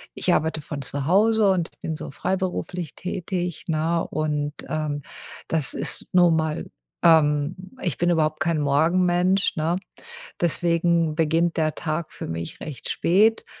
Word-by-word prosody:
ich - - +1
arbeite 160 0 0
von 145 -1 -6
zu 140 +1 -4
Hause 210 +3 +4
und 175 -3 0
bin 160 - -3
so - - -6
freiberuflich 180 -1 -3
tätig, 180 -2 -4
ne? 165 +1 0
Und, 150 -1 -2
ähm, 150 -2 -2 0.5
das 160 -4 +1
ist 140 +4 -1
nun 175 -2 +5
mal, 155 -1 -1 0.4
ähm 150 -1 +4 0.3
ich 175 -7 -2
bin 175 0 +1
überhaupt 155 -2 +1
kein 160 0 +1
Morgenmensch, 175 +7 +2
ne? 165 +2 0 0.6
Deswegen 170 -1 +2
beginnt 165 +1 +1
der 155 -1 +1
Tag 155 +1 -3
für - - -6
mich 80 0 -5
recht 145 -6 -7
spät. 210 +6 +3
165 Hz, 140 wpm, -24 LUFS, 155-175 Hz, 0.6 s, nun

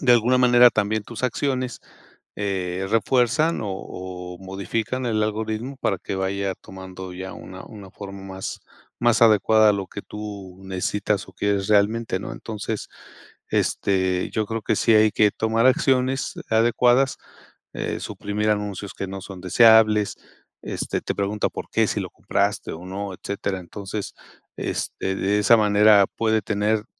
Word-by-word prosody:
de 125 -3 +5
alguna 120 +2 +4
manera, 125 -1 +7
también 110 0 0
tus 115 +3 -9
acciones, 130 0 -1 0.6
eh, 95 -2 -2
refuerzan 125 +8 +2
o 105 - -3 0.7
o - - -13
modifican 100 +6 -3
el 110 -2 +1
algoritmo 110 +4 -3
para 100 -3 0
que - - -5
vaya 95 0 -1
tomando 95 -1 -9
ya 95 +1 -7
una 95 0 -10
una 100 -3 -12
forma 100 -1 -9
más 95 0 -6 0.4
más 120 -1 +3
adecuada 110 0 +5
a - - +3
lo 100 -1 -3
que 100 - -8
tú 100 -3 -8
necesitas 95 +2 -2
o - - -13
quieres 100 -1 -1
realmente, 105 0 +2
¿no? 110 - -6
Entonces, 110 -1 -5 0.6
este, 95 -2 0
yo 110 -1 -1
creo 115 0 -4
que 110 - 0
sí 115 - +3
hay 110 0 +6
que 105 -1 +4
tomar 115 +2 +1
acciones 130 0 +2 0.2
adecuadas, 120 +3 +3 0.6
eh, - - -3
suprimir 105 +1 -3
anuncios 105 -2 -3
que 95 - -4
no 95 0 -6
son 95 -2 -9
deseables, 110 +1 +5 0.5
este, - - -3
te - - -3
pregunta 100 +1 -1
por - - -7
qué, - - +2
si - - -1
lo - - -4
compraste 100 +1 -1
o 85 +3 -8
no, 100 +1 -5
etcétera. 100 0 -4
Entonces, 100 +3 -6 0.4
este, 95 - -3
de 100 +2 +1
esa 105 +3 +6
manera 105 -1 +5
puede 110 -1 +2
tener 105 +2 0
105 Hz, 155 wpm, -23 LUFS, 95-115 Hz, 0.7 s, manera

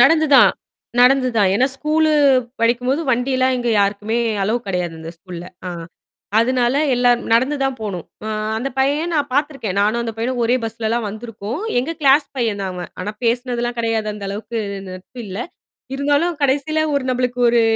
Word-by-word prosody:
நடந்து 315 +5 +5
தான், - - +8 0.5
நடந்து 255 +1 +5
தான். 200 -3 +4
ஏன்னா 250 +6 +3
ஸ்கூலு 310 +2 +2 0.5
படிக்கும் 240 +2 +1
போது 280 +4 +1
வண்டி 250 +2 0
எல்லாம் 260 0 +2
இங்க 240 - -2
யாருக்குமே 210 +3 0 0.2
அலோவ் 230 +5 -1
கெடையாது 180 -3 -2
இந்த 160 0 -7
ஸ்கூல்ல. 175 0 -9 0.2
ஆ. - - -4 0.7
அதனால 245 +1 +2 0.2
எல்லாம் 245 -1 +3
நடந்து 260 +6 +3
தான் 270 -1 0
போகணும். 200 -6 -5 0.2
அ - - -3 0.3
அந்தப் 265 +3 -4
பையன் 290 +6 +1
நான் 290 -2 0
பாத்துருக்கேன். 275 -8 -1
நானும் 215 +3 +2
அந்தப் 225 -1 -5
பையனும் 245 +2 -1
ஒரே 245 +2 +3
பஸ்லலாம் 225 0 -2
வந்துருக்கோம். 220 - -6 0.2
எங்க 265 +7 -1
கிளாஸ் 285 +1 +5
பையன் 225 -5 -1
தான் 190 - -2
அவன். 180 -1 -7
ஆனா 205 +3 -3
பேசுனதெல்லாம் 240 0 -1
கெடையாது. 225 -2 0
அந்த 200 -1 -6
அளவுக்கு 215 +3 -5 0.3
நட்பு 185 +7 -11
இல்ல. 190 +1 -6 0.6
இருந்தாலும் 290 +4 +1
கடைசியில 285 +3 +1
ஒரு 280 -2 0
நம்பளுக்கு 250 0 -1
ஒரு 235 0 +4
240 Hz, 170 wpm, -19 LUFS, 215-270 Hz, 0.7 s, தான்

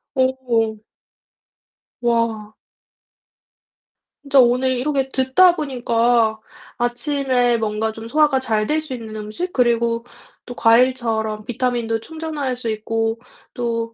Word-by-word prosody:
오. 245 -5 0 1.2
와. 230 -3 0 1.7
진짜 280 -1 +3
오늘 250 +1 +4
이렇게 270 0 -1
듣다 265 +8 +4
보니까 235 -6 +1 0.4
'아침에 245 0 0
뭔가 220 0 -1
좀 225 +1 -9
소화가 295 +1 +3
잘 220 -4 0
될 310 +1 +1
수 305 -4 -6
있는 225 -3 -7
음식 215 +13 -5
그리고 235 -1 +1 0.4
또 245 - -8
과일처럼 225 -3 +2
비타민도 235 -1 -1
충전할 310 -4 -4
수 235 -2 -4
있고 225 +1 -2 0.3
또 230 -1 -3
240 Hz, 210 characters per minute, -20 LUFS, 225-260 Hz, 1.7 s, 오늘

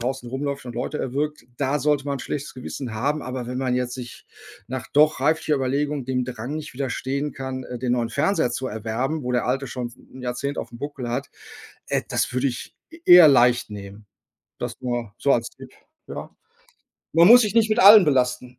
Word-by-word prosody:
draußen 125 0 -3
rumläuft 140 +1 -4
und 120 - -7
Leute 125 +5 -3
erwürgt, 150 +4 -3
da 140 +1 0
sollte 150 -2 +1
man 140 -1 -2
'n - - -8
schlechtes 145 +3 -5
Gewissen 130 -1 -6
haben, 145 +7 -1
aber 130 -1 -5
wenn 125 +1 -4
man 130 -1 0
jetzt 125 -1 -2
sich 125 -2 -9 0.4
nach 130 0 -5
doch 150 -1 +4
reiflicher 155 +2 +1
Überlegung 140 +1 -1
dem 125 0 -1
Drang 125 +3 -5
nicht 150 -5 -7
widerstehen 140 +2 -3
kann, 130 0 -5
äh, 125 - -7
den 125 0 -1
neuen 120 -2 0
Fernseher 155 -3 +1
zu 130 +2 -3
erwerben, 115 +7 -3
wo 125 - -3
der 125 - 0
alte 135 +2 -1
schon 125 -1 -4
s 120 - -17
'n 130 - -14
Jahrzehnt 125 +3 -3
auf'm 120 - -6
Buckel 140 -2 -5
hat, 120 - -3 0.6
äh, - - 0
das - - -1
würde 130 +2 +1
ich 120 - -7 0.2
e 330 - -13
eher 175 -3 +10
leicht 120 -4 +4
nehmen. 100 0 -10 0.5
Das 120 -1 -5
nur 120 -4 -3
so 140 - +2
als 115 -1 0
Tipp, - - -14 0.4
ja? - - -7 0.8
Man 170 +2 +7
muss 245 +2 +9
sich 210 -1 -2
nicht 225 -1 +3
mit 215 - +1
allen 205 0 +9
belasten. 125 -3 0
130 Hz, 205 wpm, -23 LUFS, 125-145 Hz, 0.8 s, eher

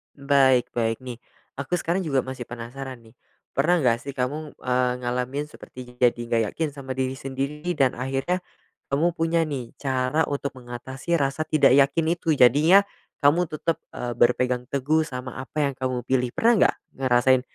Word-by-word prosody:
Baik-baik, 130 -5 +2
nih 125 -2 -7 0.4
aku 140 +5 -5
sekarang 175 +2 0
juga 135 -4 +1
masih 130 -1 -7
penasaran 120 +2 -8
nih. 110 -1 -20 0.3
Pernah 170 +5 +2
nggak 120 -3 +3
sih 140 - -5
kamu, 145 +4 -3
eee, 125 0 +1
ngalamin 125 +4 -2
seperti 125 -3 -12
jadi 125 -1 +4 0.2
nggak 115 -1 +2
yakin 160 -2 -1
sama 140 -2 -7
diri 130 0 -2
sendiri 135 +3 -4
dan 135 -5 +1
akhirnya 135 +7 -1 0.6
kamu 160 +5 +3
punya 165 +1 +2
nih 135 -6 -5
cara 130 +2 0
untuk 140 -1 -3
mengatasi 130 +6 -3
rasa 140 0 -1
tidak 155 -4 +5
yakin 145 +4 +3
itu? 170 -1 -5
Jadinya 155 +11 +6 0.4
kamu 165 +4 +4
tetap, 160 +2 -2
eee, 120 -1 -4
berpegang 125 +1 +1
teguh 145 +3 +1
sama 125 -2 -6
apa 145 +3 -2
yang 140 - -1
kamu 130 -2 -2
pilih. 125 -1 +1
Pernah 235 +1 +4
nggak - - +4 0.3
ngerasain 130 0 +4
135 Hz, 160 wpm, -24 LUFS, 125-150 Hz, 0.6 s, Jadinya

